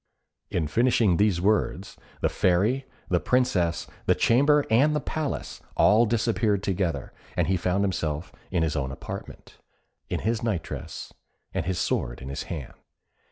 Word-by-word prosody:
In 80 -4 -1
finishing 115 -1 +3
these 100 -4 +3
words 100 0 0 0.3
the - - +3
Fairy, 105 +10 +1 0.2
the 90 - +3
Princess, 95 -11 +1 0.2
the - - +5
chamber, 145 +4 +4
and 145 +7 +4
the - - +2
palace, 150 0 -4 0.2
all 110 +3 +5
disappeared 105 -3 +1
together, 95 -3 -1 0.2
and - - +3
he 95 - +1
found 90 +2 +1
himself 80 -4 -2 0.2
in 85 -3 +1
his 80 -2 0
own 65 0 -1
apartment, 65 - -9 0.5
in - - -2
his 115 +2 0
night 105 -8 -1
dress, 75 +3 -7 0.4
and 80 - -2
his 95 -2 -1
sword - - -1
in 65 - -8
his 70 - -4
hand. 75 -7 -5
95 Hz, 155 wpm, -26 LUFS, 85-115 Hz, 0.5 s, the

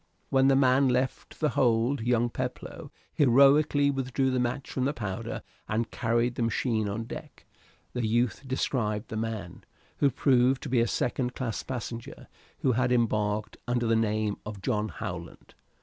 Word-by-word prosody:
When 135 0 +4
the 135 - +5
man 135 0 +4
left 125 +1 -2
the 155 - +2
hold 120 +1 +2
young 120 0 +1
Peploe 130 +5 -5 0.2
heroically 140 +1 +5
withdrew 135 0 0
the 130 - +1
match 125 +3 -2
from 130 - -1
the 140 - +1
powder 95 -6 -4 0.3
and 110 +2 -1
carried 120 +1 +1
the 120 - -4
machine 115 -2 0
on 110 +3 -3
deck. 115 - -9 0.5
The 120 -3 -1
youth 120 +2 +1
described 115 -5 -1
the - - -5
man, 110 -5 -4 0.3
who 140 - +4
proved 130 0 +2
to - - -5
be 125 -1 +3
a 115 - +3
second 125 +2 -1
class 120 -4 -3
passenger, 120 -2 -6 0.3
who 130 - +3
had 125 +1 +1
embarked 105 -3 0
under 120 0 0
the 115 0 +3
name 110 -2 0
of 105 -2 -8
John 110 -2 0
Howland. 85 -4 -7
120 Hz, 165 wpm, -28 LUFS, 110-130 Hz, 0.5 s, the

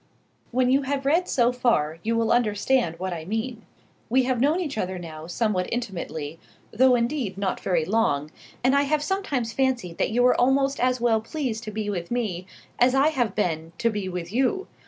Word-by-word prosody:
When 250 +1 +2
you 275 +2 +4
have 275 0 -2
read 335 +6 +2
so 240 -1 +3
far 165 -11 +1
you 230 +3 0
will 230 -1 +1
understand 220 -4 +1
what 185 +1 -3
I 165 -2 -5
mean. 225 +5 -3 0.5
We 260 +3 +3
have 250 -2 0
known 300 +6 +3
each 315 -6 -3
other 185 -3 -2
now 160 -2 -8
somewhat 185 0 0
intimately, 170 -9 -4 0.3
though 255 +3 +5
indeed 235 -4 -1
not 195 -1 -1
very 170 -4 0
long, 155 -8 +1 0.3
and 260 +2 +4
I 280 - +5
have 295 +1 +1
sometimes 290 - -2
fancied 255 -11 -1
that - - +2
you 245 +3 +2
were 250 0 +4
almost 270 +2 +2
as 255 0 +2
well 230 -2 +2
pleased 235 -2 -3
to 215 - -5
be 210 0 -3
with 175 -4 -3
me 205 -7 -2 0.3
as 250 +2 +4
I 275 +3 +5
have 245 -8 -1
been 165 -5 -1
to 230 -1 +1
be 205 -3 -3
with 180 +1 -5
you. 270 - +1
230 Hz, 200 wpm, -25 LUFS, 185-260 Hz, 0.5 s, though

